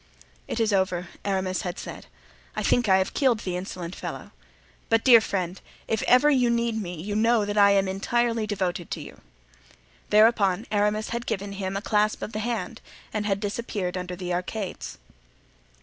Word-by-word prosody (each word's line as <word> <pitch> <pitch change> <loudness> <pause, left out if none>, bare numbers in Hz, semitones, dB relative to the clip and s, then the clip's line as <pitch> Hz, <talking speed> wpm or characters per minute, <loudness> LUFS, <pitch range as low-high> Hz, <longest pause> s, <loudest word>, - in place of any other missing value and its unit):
"It - - -3
is 225 -2 +2
over," 185 -2 0
Aramis 190 -2 -1
had 180 0 -4
said. - - -8 0.5
"I - - -2
think 245 -4 +2
I 190 - +6
have 190 0 0
killed 255 -6 +2
the 180 -2 -3
insolent 180 -1 -5
fellow. - - -7 0.6
But, 225 0 +3
dear 240 -3 +9
friend, 185 -3 -3 0.3
if 220 - 0
you - - -3
ever 255 +4 +6
need 235 -4 +2
me 175 -4 -6
you 205 +5 -4
know 225 0 +3
that 205 0 -3
I 200 -1 +6
am 195 -1 +3
entirely 230 +3 0
devoted 185 -4 -2
to - - -4
you." - - -11 0.9
Thereupon 210 -2 +4
Aramis 210 +1 +1
had 235 +1 -4
given 200 0 -2
him 195 -1 -3
a 200 - -5
clasp 215 -1 +1
of - - -5
the 215 - -2
hand 235 +1 -3 0.3
and 210 -1 -1
had 195 -1 +1
disappeared 205 -3 -3
under 180 0 -4
the 180 0 -4
arcades. 185 +2 -4
205 Hz, 180 wpm, -26 LUFS, 190-225 Hz, 0.9 s, dear